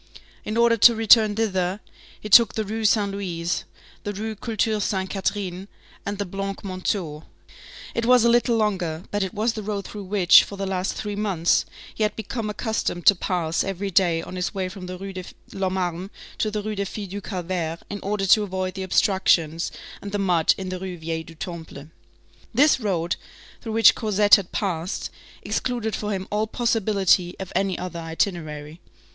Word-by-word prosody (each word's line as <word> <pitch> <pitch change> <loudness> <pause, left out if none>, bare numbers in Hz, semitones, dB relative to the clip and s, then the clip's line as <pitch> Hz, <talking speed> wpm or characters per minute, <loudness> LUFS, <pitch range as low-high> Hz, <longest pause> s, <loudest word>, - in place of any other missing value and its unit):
In 215 +2 -3
order 235 0 +4
to 235 +2 +7
return 220 -1 +5
thither, 190 -3 0 0.4
he - - -7
took 215 +1 +7
the 220 - 0
Rue 220 +2 -3
Saint 205 -1 +3
Louis, 175 -3 -3 0.4
the 205 - -3
Rue 220 +2 -4
Culture 220 -1 -1
Sainte 190 -2 -1
Catherine, 195 -1 -3 0.4
and 200 0 -2
the 205 - -2
Blancs 195 +1 -5
Manteaux; 185 -5 -3 0.7
it 230 0 -1
was 250 -2 +6
a - - +5
little 235 0 +3
longer, 185 -7 -1
but 205 - -1
it 190 -2 -1
was 220 +3 +1
the 220 - -5
road 200 -2 -4
through 205 -2 -7
which, 185 -2 +6
for 200 - -8
the 195 - -2
last 190 -1 -1
three 205 -1 -4
months, 195 -5 +1 0.3
he - - -8
had 210 -1 +1
become 220 0 -4
accustomed 210 -5 -2
to 205 - +9
pass 175 -3 -1
every 195 0 -3
day 170 -3 +3
on 185 - -7
his 180 +3 -2
way 190 -1 -2
from 185 -1 -9
the 185 0 -6
Rue 195 +1 -7
de 185 -1 -6 0.3
l'Homme 190 -1 -1
Armé 180 0 -2 0.3
to 215 - +1
the 210 0 -3
Rue 215 0 -3
des 200 -1 -2
Filles 200 0 -6
du 205 +1 -5
Calvaire, 175 -4 -3
in 205 - -5
order 200 0 -1
to 210 +3 +6
avoid 185 -2 -3
the 195 - -6
obstructions 175 -4 +2 0.3
and 200 - -7
the 205 - -1
mud 180 -5 +3
in 190 -1 -5
the 185 0 -4
Rue 185 -1 -6
Vieille 160 0 -4
du 165 - -13
Temple. 160 -4 -8 0.7
This 290 +2 +5
road, 180 -7 -1 0.4
through 225 - -5
which 225 0 +7
Cosette 210 -2 +1
had 195 -4 +7
passed, 180 -3 -2 0.3
excluded 235 -3 -2
for 210 0 -3
him 190 -1 -3
all 210 +1 0
possibility 205 -6 +1
of 190 - -7
any 190 -1 +1
other 180 -1 -5
itinerary. 160 -2 -3
195 Hz, 190 wpm, -24 LUFS, 180-210 Hz, 0.7 s, to